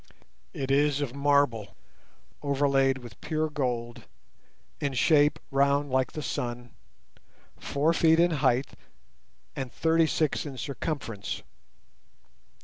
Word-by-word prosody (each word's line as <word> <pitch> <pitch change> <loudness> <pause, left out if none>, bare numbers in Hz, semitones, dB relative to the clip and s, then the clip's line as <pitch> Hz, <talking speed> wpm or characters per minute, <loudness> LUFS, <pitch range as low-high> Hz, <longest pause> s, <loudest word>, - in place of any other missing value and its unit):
It 135 0 -3
is 145 0 +3
of 140 -4 -3
marble 140 -6 +1 0.7
overlaid 140 -2 +2
with 120 -5 -12
pure 155 0 -1
gold, 120 -5 -3 0.7
in 140 -2 -2
shape 145 +3 +4
round 140 +1 +2
like 130 -1 +1
the 155 - -5
sun, 120 -1 -4 0.9
four 150 +4 +1
feet 165 -1 +4
in 175 0 +4
height, 130 -1 +2 0.8
and 130 -2 -4
thirty 165 0 +2
six 155 -1 0
in 140 -3 -7
circumference. 135 -7 -4
140 Hz, 110 wpm, -27 LUFS, 130-150 Hz, 0.9 s, shape